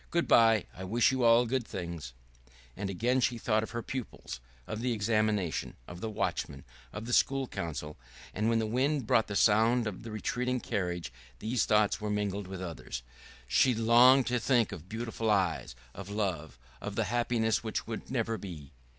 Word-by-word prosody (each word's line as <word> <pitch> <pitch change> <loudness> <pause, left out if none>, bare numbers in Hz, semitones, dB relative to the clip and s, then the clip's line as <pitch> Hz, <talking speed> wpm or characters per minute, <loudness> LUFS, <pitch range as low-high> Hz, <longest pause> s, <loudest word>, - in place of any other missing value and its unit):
"Good 170 0 0
by! 115 -3 +5
I 95 - -7
wish 115 +7 +3
you 130 -1 0
all 115 +1 +6
things 90 - -3 0.3
good!" - - -28 0.2
And 100 0 -4
again 120 +7 +1
she 120 -1 +1
thought 110 -1 +1
of 110 - -5
her 115 -1 -4
pupils, 125 - -6 0.3
of 110 - -5
the 125 0 0
examination, 105 -5 0
of 90 +1 -9
the 110 - -3
watchman, 70 -9 -3 0.3
of 105 +2 -6
the 120 - -3
School 135 +1 +3
Council; 75 -5 -5 0.4
and 105 +2 0
when 115 - +3
the 110 - +1
wind 130 +4 0
brought 110 - +3
the 100 - -4
sound 115 +4 +4
of 105 -4 -4
the 115 - -8
retreating 125 +4 -1
carriage 90 - -3 0.2
these 110 - 0
thoughts 105 0 +2
were 105 - -2
mingled 105 -1 -2
with 95 -1 -6
others. 75 -7 -6 0.4
She 125 - +4
longed 120 +4 +6
to 125 0 0
think 120 -2 +2
of 85 +4 -9
beautiful 115 0 -3
eyes, 95 -10 +1 0.2
of 100 0 -8
love, 90 - -3 0.2
of 105 -1 -5
the 115 - +1
happiness 115 0 0
which 110 - -3
would 115 -1 -6
never 115 -4 -1
be.... 80 -7 -9
110 Hz, 185 wpm, -30 LUFS, 95-120 Hz, 0.4 s, all